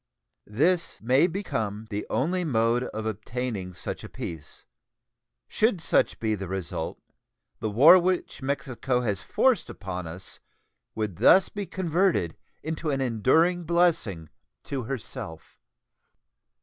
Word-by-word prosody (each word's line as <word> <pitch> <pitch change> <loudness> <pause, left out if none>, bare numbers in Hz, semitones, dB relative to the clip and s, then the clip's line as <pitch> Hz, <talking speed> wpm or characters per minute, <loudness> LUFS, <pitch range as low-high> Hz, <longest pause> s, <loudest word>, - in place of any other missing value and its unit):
This 165 - +1
may 130 +9 +4
become 110 - -3
the 105 +1 -3
only 180 +7 0
mode 120 -4 +1
of 110 -2 -5
obtaining 110 -3 -4
such - - -5
a - - -8
peace. 80 -3 -8 0.8
Should 215 -4 +1
such 160 - +1
be 110 -1 0
the 95 -2 -4
result, 95 -3 -4 0.6
the 110 - -2
war 150 - +8
which 180 -4 -1
Mexico 130 -2 -1
has 105 -6 -1
forced 255 -8 +2
upon 90 -3 -6
us 90 +4 -9 0.6
would 105 -6 -3
thus 190 0 +6
be 205 -2 -5
converted 175 - +1 0.3
into 160 0 -3
an 135 -2 0
enduring 135 - +2
blessing 160 - +1 0.3
to 135 -2 -3
herself. 110 -10 -7
125 Hz, 125 wpm, -26 LUFS, 105-170 Hz, 0.8 s, war